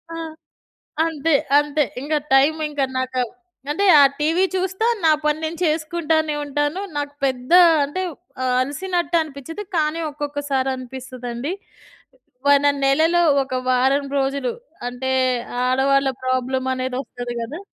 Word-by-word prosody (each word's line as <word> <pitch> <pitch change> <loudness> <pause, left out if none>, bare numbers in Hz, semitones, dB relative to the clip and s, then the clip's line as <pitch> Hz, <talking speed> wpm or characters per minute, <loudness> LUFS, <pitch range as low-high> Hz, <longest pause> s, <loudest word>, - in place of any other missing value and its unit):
ఆ! - - -5 0.9
అంతే, 320 -1 +1 0.2
అంతే. 295 +1 +1 0.2
ఇంగ 295 +3 -3 0.2
టైమ్ 285 +4 +4
ఇంకా 290 -2 0
నాకు 260 0 -1 0.5
అంటే 400 +7 0
ఆ - - +8 0.2
టీవీ 325 +5 +2
చూస్తా 380 +4 -1 0.2
నా 315 - +6
పని 300 0 +1
నేను 325 +1 -4
చేసుకుంటానే 315 -1 0
ఉంటాను. 290 +6 -1 0.2
నాకు 290 0 -3
పెద్ద 255 0 -3 0.3
అంటే 290 +7 -4 0.4
ఆహ్, 250 -1 +1
అలసినట్టు 345 +6 -2
అనిపిచ్చదు. 315 +5 -7
కానీ 310 +1 0
ఒక్కొక్కసారి 285 -2 -2
అనిపిస్తదండి. 255 +2 -6 1.0
ఒన 285 0 +4 0.2
నెలలో 320 +6 +3 0.2
ఒక 260 -1 -5
వారం 265 +3 +2
రోజులు 270 -1 0 0.4
అంటే 250 +2 -4 0.6
ఆడవాళ్ళ 270 +2 +2
ప్రాబ్లమ్ 255 0 -1
అనేది 255 0 -3
వస్తది 245 -2 -7
గదా! 275 +9 -6
285 Hz, 120 wpm, -21 LUFS, 260-315 Hz, 1.0 s, ఆ